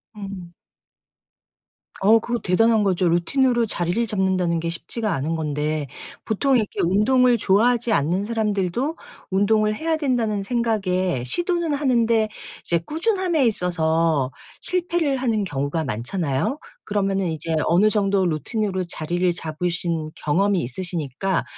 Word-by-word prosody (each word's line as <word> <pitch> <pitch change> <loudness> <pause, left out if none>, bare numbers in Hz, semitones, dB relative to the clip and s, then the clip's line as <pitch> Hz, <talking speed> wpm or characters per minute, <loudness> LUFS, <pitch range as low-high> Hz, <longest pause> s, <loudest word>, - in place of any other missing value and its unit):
음. 195 -4 -8 1.5
어 215 +4 +5
그거 240 +2 -2
대단한 220 +4 +3
거죠. 185 -2 +1
루틴으로 240 +8 +2
자리를 185 +3 0
잡는다는 190 -5 0
게 165 +1 -3
쉽지가 210 +5 -3
않은 150 +5 -2
건데. 150 -1 -2 0.4
보통 265 +5 +1
이렇게 215 -4 -1
운동을 240 +7 +3
좋아하지 230 +4 +2
않는 175 +4 +1
사람들도 220 - -1 0.4
'운동을 215 +2 +2
해야 320 +6 -1
된다.'는 235 -9 0
생각에 195 - 0
시도는 345 - +1
하는데 235 -6 +2 0.3
이제 170 - +2
꾸준함에 345 - +1
있어서 165 - +1 0.3
실패를 345 -6 +1
하는 230 -5 0
경우가 145 0 -2
많잖아요. 140 - -2 0.3
그러면은 195 -2 0
이제 160 0 -2
어느 185 +6 +4
정도 200 -3 +1
루틴으로 190 - -2
자리를 175 +3 0
잡으신 170 0 -3
경험이 190 +6 +1
있으시니까 170 +4 -2
195 Hz, 310 characters per minute, -22 LUFS, 170-235 Hz, 1.5 s, 어